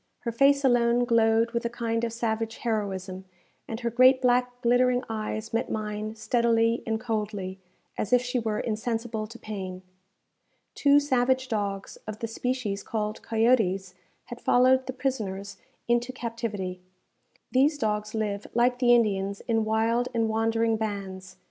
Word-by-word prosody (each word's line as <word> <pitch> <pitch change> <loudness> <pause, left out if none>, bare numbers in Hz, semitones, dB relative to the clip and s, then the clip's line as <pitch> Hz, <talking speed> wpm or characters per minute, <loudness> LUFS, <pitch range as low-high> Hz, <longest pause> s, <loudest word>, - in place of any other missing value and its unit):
Her 235 - -2
face 275 +4 +4
alone 245 -1 +3
glowed 230 -1 +3
with 235 0 -2
a 235 - -1
kind 230 -1 -2
of 235 - -1
savage 225 -1 -2
heroism, 190 -4 -3 0.4
and 225 +1 -5
her 235 -1 -1
great 255 +2 +6
black 250 -1 +1
glittering 245 +1 +3
eyes 220 0 -4
met 230 - 0
mine 215 0 -4
steadily 230 0 +2
and 220 0 0
coldly, 210 -5 -3 0.4
as 205 - -2
if 250 - +6
she 250 +1 -2
were 220 -2 -2
insensible 225 0 -2
to 230 +2 -11
pain. 190 -4 -6 0.9
Two 285 0 +5
savage 260 -2 +1
dogs, 200 -3 -3
of 215 -1 -5
the 230 - -4
species 225 -3 -2
called 215 0 -3
coyotes, 220 -5 +1 0.3
had 240 0 -9
followed 260 +1 +4
the 260 - -3
prisoners 200 -7 -3 0.3
into 240 +1 +1
captivity. 225 -7 -4 0.7
These 285 +4 +3
dogs 210 -2 -2
live, 210 -2 -2
like 245 +1 +3
the 240 -1 +6
Indians, 200 -3 0
in 225 -2 0
wild 225 +3 +1
and 225 -1 +2
wandering 225 0 +1
bands. 190 -3 -5
225 Hz, 150 wpm, -27 LUFS, 210-245 Hz, 0.9 s, great